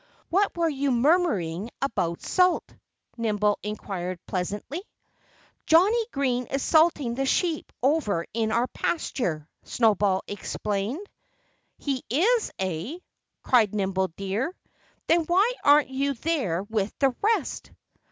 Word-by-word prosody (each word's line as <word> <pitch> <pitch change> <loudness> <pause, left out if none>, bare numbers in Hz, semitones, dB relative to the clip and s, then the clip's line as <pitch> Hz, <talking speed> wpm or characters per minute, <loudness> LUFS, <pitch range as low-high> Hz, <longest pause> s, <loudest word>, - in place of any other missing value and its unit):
"What 390 +1 +2
were 335 -1 +2
you 285 -2 -1
murmuring 235 - +1
about 175 -11 -2
salt?" 365 -1 +2 0.4
Nimble 210 -2 +1
inquired 190 -3 -4
pleasantly. 205 - -3 0.9
"Johnnie 420 +8 +4
Green 250 -3 0
is 275 0 -2
salting 310 -6 +3
the 270 +2 -1
sheep 330 +2 0
over 255 - +1
in 220 -1 0
our 235 +2 +2
pasture," 180 - -2
Snowball 205 -4 +2
explained. 205 - -3 0.7
"He 270 -3 -3
is, 425 - +2
eh?" 190 - -3 0.5
cried 220 -5 +3
Nimble 190 -2 0
Deer. 205 - -2 0.5
"Then 335 0 +3
why 380 +8 +3
aren't 290 -1 +5
you 275 +1 -1
there 230 - -1
with 210 -1 -2
the 270 -3 +2
rest?" 440 +2 0
250 Hz, 115 wpm, -26 LUFS, 200-320 Hz, 0.9 s, aren't